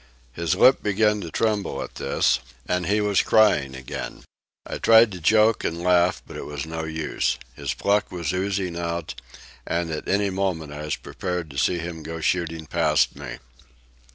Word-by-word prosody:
His 85 Hz, +5 st, 0 dB
lip 130 Hz, +7 st, +6 dB
began 105 Hz, 0 st, +2 dB
to 85 Hz, -, -6 dB
tremble 105 Hz, +1 st, -1 dB
at -, -, -10 dB
this, -, -, +1 dB, 0.3 s
and 90 Hz, -1 st, 0 dB
he 105 Hz, +1 st, +2 dB
was 105 Hz, -2 st, +3 dB
crying 75 Hz, -12 st, +3 dB
again. 65 Hz, 0 st, -7 dB, 0.4 s
I -, -, -5 dB
tried 115 Hz, -1 st, +6 dB
to 90 Hz, -, -7 dB
joke 110 Hz, +5 st, +4 dB
and 85 Hz, +1 st, -3 dB
laugh, 90 Hz, 0 st, +3 dB
but -, -, -11 dB
it -, -, -6 dB
was 75 Hz, -1 st, -5 dB
no 80 Hz, 0 st, -4 dB
use. 80 Hz, 0 st, -1 dB, 0.2 s
His -, -, -3 dB
pluck 100 Hz, +1 st, +1 dB
was 85 Hz, -2 st, -3 dB
oozing 95 Hz, -2 st, -1 dB
out, 85 Hz, -1 st, -3 dB, 0.5 s
and 85 Hz, -1 st, -2 dB
at 75 Hz, -, -5 dB
any 100 Hz, 0 st, +1 dB
moment 90 Hz, -6 st, -2 dB
I 75 Hz, +1 st, -6 dB
was 75 Hz, -, -1 dB
prepared 90 Hz, -4 st, -5 dB
to 70 Hz, -, -10 dB
see 90 Hz, +7 st, +2 dB
him 85 Hz, -1 st, -5 dB
go 80 Hz, +2 st, -6 dB
shooting 80 Hz, -1 st, -1 dB
past -, -, +2 dB
me. -, -, -7 dB
85 Hz, 180 wpm, -24 LUFS, 80-100 Hz, 0.5 s, lip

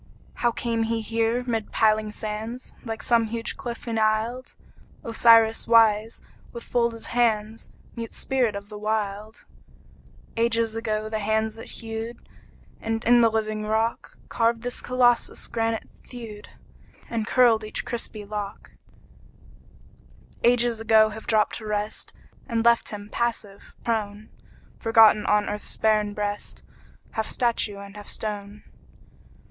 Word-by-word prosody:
How 240 Hz, -, +2 dB
came 230 Hz, -1 st, -2 dB
he 225 Hz, 0 st, 0 dB
here 230 Hz, +2 st, 0 dB
mid 225 Hz, -3 st, -2 dB
piling 215 Hz, -1 st, +2 dB
sands, 220 Hz, +4 st, -5 dB
Like 225 Hz, -2 st, -5 dB
some 235 Hz, -1 st, +3 dB
huge 230 Hz, +1 st, -3 dB
cliff 240 Hz, 0 st, -7 dB
enisled, 225 Hz, +3 st, 0 dB, 0.5 s
Osiris 225 Hz, -1 st, +5 dB
wise, 225 Hz, -1 st, +4 dB, 0.3 s
with 235 Hz, -, -7 dB
folded 235 Hz, -1 st, -1 dB
hands, 225 Hz, -2 st, 0 dB, 0.3 s
Mute 230 Hz, -1 st, -6 dB
spirit 250 Hz, -6 st, 0 dB
of 200 Hz, +1 st, -7 dB
the 210 Hz, -1 st, -8 dB
Wild? 215 Hz, 0 st, -3 dB, 0.9 s
Ages 230 Hz, -1 st, +1 dB
ago 215 Hz, -1 st, -2 dB
the 220 Hz, 0 st, -2 dB
hands 220 Hz, +1 st, 0 dB
that 225 Hz, -, -11 dB
hewed, 225 Hz, +1 st, -7 dB, 0.5 s
And 225 Hz, 0 st, -2 dB
in 240 Hz, +1 st, +6 dB
the 230 Hz, -, +5 dB
living 215 Hz, -1 st, -2 dB
rock 220 Hz, +2 st, -1 dB
Carved 230 Hz, 0 st, +1 dB
this 245 Hz, 0 st, -2 dB
Colossus, 245 Hz, -1 st, +2 dB
granite 225 Hz, -1 st, -2 dB, 0.2 s
thewed 225 Hz, -4 st, -10 dB, 0.6 s
And 225 Hz, -2 st, -3 dB
curled 235 Hz, -3 st, +4 dB
each 215 Hz, -, -5 dB
crispy 225 Hz, -3 st, -4 dB
lock: 205 Hz, -1 st, -6 dB, 1.7 s
Ages 240 Hz, -1 st, +3 dB
ago 220 Hz, -1 st, +5 dB
have 220 Hz, +1 st, -9 dB
dropped 215 Hz, -1 st, +2 dB
to 220 Hz, -, -8 dB
rest 210 Hz, 0 st, -3 dB, 0.4 s
And 230 Hz, -2 st, -1 dB
left 235 Hz, 0 st, +4 dB
him 205 Hz, -1 st, -7 dB
passive, 225 Hz, -4 st, -3 dB
prone, 215 Hz, -2 st, -2 dB, 0.5 s
Forgotten 225 Hz, -2 st, +5 dB
on 210 Hz, 0 st, +3 dB
earth's 205 Hz, 0 st, -5 dB
barren 215 Hz, -1 st, +2 dB
breast, 205 Hz, 0 st, -4 dB, 0.5 s
Half 220 Hz, 0 st, -2 dB
statue 235 Hz, -4 st, 0 dB
and 200 Hz, 0 st, -10 dB
half 205 Hz, -1 st, -10 dB
stone. 205 Hz, -1 st, -5 dB
225 Hz, 130 wpm, -25 LUFS, 215-230 Hz, 1.7 s, in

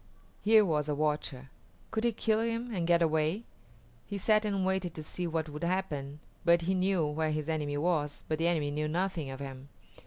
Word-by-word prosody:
Here 215 Hz, 0 st, +6 dB
was 150 Hz, -4 st, 0 dB
a 145 Hz, -, +1 dB
watcher. 145 Hz, -3 st, -2 dB, 0.4 s
Could 220 Hz, +1 st, 0 dB
he 235 Hz, -, +4 dB
kill 220 Hz, 0 st, +1 dB
him 230 Hz, +1 st, -2 dB
and 175 Hz, -4 st, -1 dB
get 170 Hz, 0 st, +5 dB
away? 160 Hz, +6 st, +1 dB, 0.6 s
He 205 Hz, -, -3 dB
sat 215 Hz, +2 st, +3 dB
and 200 Hz, -2 st, 0 dB
waited 190 Hz, -2 st, -1 dB
to 155 Hz, -, -5 dB
see 175 Hz, +3 st, -3 dB
what 160 Hz, -1 st, -1 dB
would 150 Hz, +2 st, -7 dB
happen, 150 Hz, -6 st, -2 dB, 0.2 s
for 170 Hz, 0 st, +6 dB
he 175 Hz, +3 st, 0 dB
knew 185 Hz, -3 st, +2 dB
where 155 Hz, +1 st, 0 dB
his 155 Hz, 0 st, -2 dB
enemy 150 Hz, -3 st, -1 dB
was, 150 Hz, -2 st, 0 dB
but 155 Hz, 0 st, -1 dB
the 165 Hz, -, +2 dB
enemy 155 Hz, -4 st, +1 dB
knew 150 Hz, +1 st, -1 dB
nothing 170 Hz, -2 st, -1 dB
of 135 Hz, 0 st, -6 dB
him. 135 Hz, 0 st, -8 dB
165 Hz, 205 wpm, -31 LUFS, 150-190 Hz, 0.6 s, Here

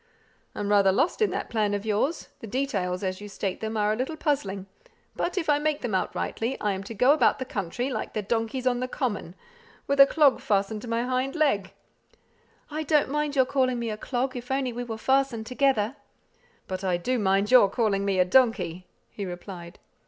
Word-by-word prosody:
"I'm 205 Hz, -, -3 dB
rather 200 Hz, -2 st, +5 dB
lost 320 Hz, -, +1 dB
in 430 Hz, -, +4 dB
that -, -, -4 dB
plan 210 Hz, -3 st, +1 dB
of 205 Hz, +1 st, -4 dB
yours; 220 Hz, +10 st, -1 dB
the 230 Hz, -, -8 dB
details, 200 Hz, -7 st, -2 dB
as 185 Hz, +1 st, -3 dB
you 205 Hz, -, -8 dB
state 195 Hz, -1 st, -4 dB
them, 220 Hz, 0 st, -3 dB
are 210 Hz, 0 st, +2 dB
a -, -, -1 dB
little 260 Hz, +7 st, -3 dB
puzzling; 200 Hz, -12 st, -1 dB, 0.5 s
but 360 Hz, -, -2 dB
if 335 Hz, -, -1 dB
I 295 Hz, -1 st, +3 dB
make 305 Hz, 0 st, -1 dB
them 240 Hz, -5 st, -3 dB
out 185 Hz, -, -1 dB
rightly, 235 Hz, +4 st, -2 dB
I 210 Hz, -, 0 dB
am 190 Hz, -1 st, -3 dB
to 225 Hz, -, -7 dB
go 250 Hz, +7 st, +5 dB
about 310 Hz, -, +3 dB
the 260 Hz, -, -4 dB
country, 230 Hz, +5 st, -3 dB
like -, -, -4 dB
the 215 Hz, -, -2 dB
donkeys 230 Hz, +4 st, -2 dB
on 245 Hz, -1 st, +2 dB
the 255 Hz, -, -2 dB
common, 205 Hz, -, -3 dB, 0.5 s
with 280 Hz, 0 st, -1 dB
a 275 Hz, -, +10 dB
clog 295 Hz, -3 st, +4 dB
fastened 205 Hz, +1 st, 0 dB
to 245 Hz, -, -8 dB
my 230 Hz, +1 st, 0 dB
hind 255 Hz, +3 st, -1 dB
leg." 205 Hz, -, +1 dB, 1.0 s
"I 305 Hz, +1 st, -2 dB
don't 300 Hz, -3 st, +2 dB
mind 300 Hz, 0 st, -1 dB
your 260 Hz, -2 st, +4 dB
calling 255 Hz, -2 st, +1 dB
me 235 Hz, -2 st, -2 dB
a -, -, -3 dB
clog, 255 Hz, +3 st, -2 dB
if 245 Hz, 0 st, -7 dB
only 265 Hz, -2 st, -1 dB
we 245 Hz, +1 st, -4 dB
were 225 Hz, -2 st, -5 dB
fastened 265 Hz, -2 st, +1 dB
together." 255 Hz, -2 st, +1 dB, 0.7 s
"But 185 Hz, 0 st, -4 dB
I 180 Hz, -2 st, +1 dB
do 250 Hz, +8 st, -1 dB
mind 195 Hz, +1 st, +1 dB
you 250 Hz, -5 st, +8 dB
calling 200 Hz, -2 st, 0 dB
me 200 Hz, -1 st, 0 dB
a 180 Hz, -, +4 dB
donkey," 185 Hz, -6 st, +2 dB, 0.2 s
he 205 Hz, -, -6 dB
replied. 175 Hz, -1 st, -8 dB
230 Hz, 210 wpm, -26 LUFS, 200-265 Hz, 1.0 s, a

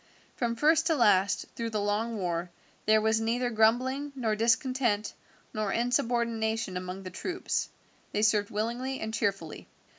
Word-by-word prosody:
From 235 Hz, -2 st, -1 dB
first 315 Hz, +4 st, +3 dB
to 325 Hz, -, +3 dB
last, 200 Hz, -6 st, +3 dB
through 230 Hz, -1 st, -3 dB
the 215 Hz, -2 st, -2 dB
long 210 Hz, +3 st, -1 dB
war, 175 Hz, -2 st, -2 dB, 0.4 s
there 215 Hz, 0 st, +6 dB
was 220 Hz, +1 st, +2 dB
neither 240 Hz, +2 st, 0 dB
grumbling, 255 Hz, +6 st, +2 dB
nor 225 Hz, -5 st, 0 dB
discontent, 230 Hz, -1 st, +1 dB, 0.4 s
nor 215 Hz, -2 st, -1 dB
insubordination 230 Hz, -3 st, 0 dB
among 185 Hz, +1 st, -5 dB
the 185 Hz, -, -7 dB
troops. 360 Hz, -, -3 dB, 0.4 s
They 210 Hz, -, 0 dB
served 210 Hz, -2 st, +3 dB
willingly 240 Hz, +5 st, -2 dB
and 220 Hz, 0 st, -4 dB
cheerfully. 195 Hz, -7 st, -2 dB
225 Hz, 145 wpm, -29 LUFS, 205-240 Hz, 0.4 s, there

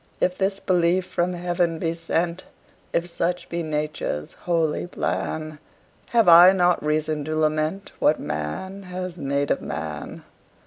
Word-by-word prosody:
If 180 Hz, -, +1 dB
this 195 Hz, +1 st, 0 dB
belief 180 Hz, 0 st, +2 dB
from 180 Hz, 0 st, -1 dB
heaven 175 Hz, -1 st, 0 dB
be 165 Hz, 0 st, -1 dB
sent, 170 Hz, +1 st, -1 dB, 0.5 s
If 170 Hz, -, 0 dB
such 175 Hz, +1 st, -2 dB
be 170 Hz, 0 st, -2 dB
Nature's 150 Hz, -, -3 dB
holy 165 Hz, -1 st, -1 dB
plan, 155 Hz, -3 st, -3 dB, 0.5 s
Have 230 Hz, -5 st, +3 dB
I 175 Hz, +2 st, +9 dB
not 180 Hz, -3 st, +2 dB
reason 155 Hz, 0 st, 0 dB
to 155 Hz, +1 st, -2 dB
lament 155 Hz, +4 st, 0 dB
What 155 Hz, -, +3 dB
man 75 Hz, -, -4 dB
has 180 Hz, -1 st, -6 dB
made 140 Hz, 0 st, 0 dB
of -, -, +1 dB
man? 75 Hz, -1 st, -6 dB
170 Hz, 140 wpm, -24 LUFS, 155-180 Hz, 0.5 s, I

